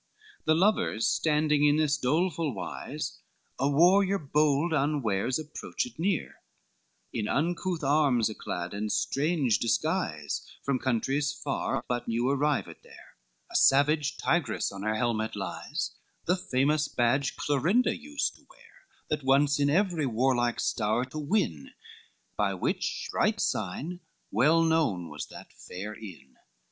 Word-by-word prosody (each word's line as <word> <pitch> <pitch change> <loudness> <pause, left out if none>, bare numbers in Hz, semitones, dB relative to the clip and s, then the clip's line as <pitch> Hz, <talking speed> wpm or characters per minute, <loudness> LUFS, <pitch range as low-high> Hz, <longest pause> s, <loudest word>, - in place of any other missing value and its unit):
XXXVIII 425 -1 -28
The 155 - +4
lovers 190 - +2
standing 150 -1 +2
in 145 0 +5
this 155 -1 +2
doleful 155 - 0
wise, - - -5 0.4
A 135 +2 +2
warrior 185 +6 +4
bold 150 +1 +1
unwares 130 -6 0
approached 160 +7 -5
near, 185 0 -1 0.7
In 105 -2 -2
uncouth 170 +4 -1
arms 140 -5 +3
yclad 90 -5 -5
and 105 +1 -3
strange 140 - +1
disguise, 115 - -1 0.2
From 140 -2 0
countries 135 +4 0
far, 140 - -3
but 120 -1 -2
new 115 +2 0
arrived 140 +2 0
there, - - -16 0.4
A - - -9
savage 145 +1 +4
tigress 160 -10 0
on 100 0 -8
her 110 +1 0
helmet 110 -1 -1
lies, 95 -2 -4 0.3
The 180 - +3
famous 150 -4 +1
badge 130 +3 +1
Clorinda 165 - +2
used 290 +4 -3
to - - -23
bear; - - -21 0.3
That 150 -2 -1
wonts 140 +2 +3
in 140 0 +3
every 170 -3 +1
warlike 120 0 +1
stowre 110 +3 0
to 155 - -5
win, 145 - -1 0.6
By 100 -2 0
which 90 - -2
bright - - +1
sign 165 - -2 0.3
well 155 +10 +4
known 155 - +1
was 75 -1 -6
that - - -12
fair 100 +4 -7
inn. 90 -12 -12
140 Hz, 135 wpm, -28 LUFS, 115-160 Hz, 0.7 s, in